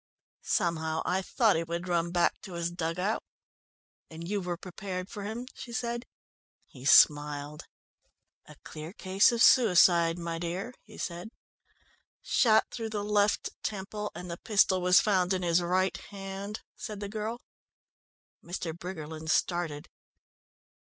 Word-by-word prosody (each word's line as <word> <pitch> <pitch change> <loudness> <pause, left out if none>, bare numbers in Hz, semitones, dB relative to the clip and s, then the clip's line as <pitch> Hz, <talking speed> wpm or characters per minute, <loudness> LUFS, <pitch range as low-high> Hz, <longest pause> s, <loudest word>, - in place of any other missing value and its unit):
Somehow 160 -3 0
I 185 +1 +1
thought 220 +2 +2
he 165 - 0
would 170 +2 -4
run 170 -1 +1
back 175 -1 +1
to 190 - -9
his 170 0 -2
dug 165 -1 -3
out." 200 +5 0 0.9
"And 165 +1 -8
you 205 +1 -1
were 175 -1 -3
prepared 185 0 -6
for 205 - -6
him?" 225 +4 -5
she 240 - -9
said. 235 +1 -3 0.6
He 130 -1 -13
smiled. 145 0 +4 0.8
"A 150 - -13
clear 155 +3 -8
case 195 +1 +3
of 235 0 +2
suicide, 175 -7 +6
my 170 -1 -4
dear," 180 +8 -4
he 215 - -15
said. 175 +4 -5 0.9
"Shot 220 -3 +4
through 225 -2 -4
the 210 -2 -3
left 205 0 +1
temple, 210 +1 -4
and 180 -1 -7
the 170 - -5
pistol 195 -3 +3
was 180 0 +6
found 190 -3 +2
in 185 -1 -1
his 170 0 +3
right 185 +2 +1
hand," 195 +1 -7
said 215 -2 -7
the 205 - -4
girl. 220 +3 -4 1.0
Mr. 170 -2 -4
Briggerland 160 -3 -7
started. 165 -3 0
180 Hz, 145 wpm, -29 LUFS, 170-205 Hz, 1.0 s, suicide